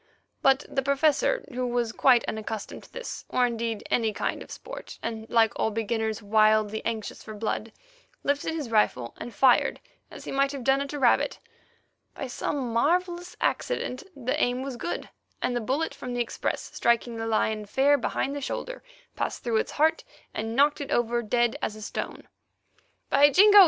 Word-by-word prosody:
But 270 Hz, +1 st, +4 dB
the 270 Hz, -, -1 dB
Professor, 285 Hz, -, +2 dB
who 250 Hz, 0 st, -1 dB
was 240 Hz, -2 st, 0 dB
quite 245 Hz, 0 st, +4 dB
unaccustomed 220 Hz, -1 st, -4 dB
to -, -, -19 dB
this, -, -, -6 dB
or, 250 Hz, -, +3 dB
indeed, 230 Hz, -2 st, -2 dB
any 225 Hz, -2 st, +2 dB
kind -, -, -2 dB
of -, -, -10 dB
sport, -, -, -9 dB
and, 225 Hz, -1 st, -4 dB
like 225 Hz, -2 st, +4 dB
all -, -, +2 dB
beginners, 220 Hz, 0 st, -2 dB
wildly 215 Hz, 0 st, +3 dB
anxious 220 Hz, -2 st, -3 dB
for 215 Hz, -, -8 dB
blood, 220 Hz, +1 st, -2 dB, 0.5 s
lifted 285 Hz, +3 st, 0 dB
his 290 Hz, -8 st, -4 dB
rifle 125 Hz, -, +2 dB
and 240 Hz, -, -6 dB
fired, 250 Hz, +3 st, +4 dB, 0.3 s
as -, -, -10 dB
he -, -, -5 dB
might 275 Hz, +1 st, +2 dB
have 275 Hz, -3 st, -5 dB
done 270 Hz, +2 st, +3 dB
at 280 Hz, -, -4 dB
a -, -, -3 dB
rabbit. 255 Hz, -4 st, +3 dB, 0.8 s
By -, -, -4 dB
some 255 Hz, -1 st, -3 dB
marvellous 350 Hz, +7 st, +1 dB
accident 265 Hz, -, -1 dB
the 255 Hz, -2 st, -1 dB
aim 250 Hz, +1 st, 0 dB
was 270 Hz, -2 st, -4 dB
good, 345 Hz, -, -4 dB, 0.3 s
and 245 Hz, -, -1 dB
the 240 Hz, -, 0 dB
bullet 270 Hz, +8 st, -1 dB
from 250 Hz, -1 st, -6 dB
the 245 Hz, -, +1 dB
express, 235 Hz, -, -3 dB
striking 235 Hz, 0 st, +1 dB
the 225 Hz, 0 st, -3 dB
lion 215 Hz, -1 st, 0 dB
fair 275 Hz, +7 st, +4 dB
behind 275 Hz, +1 st, -1 dB
the 285 Hz, -, -4 dB
shoulder, -, -, -4 dB, 0.3 s
passed -, -, -3 dB
through 235 Hz, -2 st, +1 dB
its -, -, -1 dB
heart, 315 Hz, +2 st, +2 dB, 0.3 s
and 225 Hz, +1 st, -3 dB
knocked 290 Hz, +2 st, +4 dB
it 280 Hz, -, -5 dB
over 240 Hz, 0 st, +1 dB
dead 235 Hz, +1 st, +1 dB
as 215 Hz, -, -2 dB
a 215 Hz, -, -10 dB
stone. -, -, -5 dB, 0.8 s
"By 285 Hz, +1 st, +7 dB
Jingo! 410 Hz, +6 st, +8 dB
240 Hz, 180 wpm, -27 LUFS, 225-280 Hz, 0.8 s, Jingo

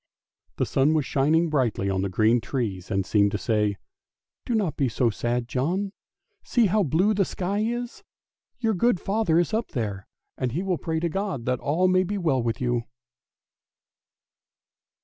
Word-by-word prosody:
The -, -, 0 dB
sun 145 Hz, +4 st, +2 dB
was 150 Hz, -3 st, +1 dB
shining 155 Hz, +6 st, +2 dB
brightly 125 Hz, -10 st, 0 dB
on 95 Hz, -1 st, 0 dB
the 100 Hz, -, -1 dB
green 110 Hz, +5 st, +3 dB
trees, 100 Hz, -5 st, -3 dB
and 95 Hz, -3 st, 0 dB
seemed 100 Hz, -1 st, +3 dB
to -, -, +1 dB
say, 105 Hz, +1 st, 0 dB, 0.3 s
" -, -, -67 dB
Do 240 Hz, -, 0 dB
not 200 Hz, -8 st, 0 dB
be 135 Hz, -4 st, +1 dB
so 120 Hz, 0 st, +1 dB
sad, 120 Hz, +2 st, -2 dB
John! 180 Hz, +11 st, -1 dB, 0.5 s
See 240 Hz, -2 st, +2 dB
how 210 Hz, +2 st, +2 dB
blue 185 Hz, +6 st, +2 dB
the 200 Hz, -1 st, +2 dB
sky 195 Hz, +2 st, -2 dB
is; 240 Hz, +2 st, -3 dB, 0.6 s
your 225 Hz, -2 st, 0 dB
good 205 Hz, 0 st, +2 dB
father 195 Hz, -4 st, +1 dB
is 175 Hz, +5 st, +1 dB
up 225 Hz, +1 st, -1 dB
there, 100 Hz, -6 st, -3 dB, 0.3 s
and 125 Hz, -3 st, -1 dB
he 175 Hz, +6 st, -1 dB
will 185 Hz, -3 st, -1 dB
pray 160 Hz, -1 st, -2 dB
to 170 Hz, -, +1 dB
God 190 Hz, -, -3 dB
that 125 Hz, -1 st, 0 dB
all 160 Hz, +6 st, +1 dB
may 185 Hz, 0 st, +4 dB
be 205 Hz, +3 st, -3 dB
well 155 Hz, -9 st, +1 dB
with 115 Hz, -1 st, -2 dB
you." 120 Hz, -2 st, 0 dB
150 Hz, 180 wpm, -25 LUFS, 115-190 Hz, 0.6 s, may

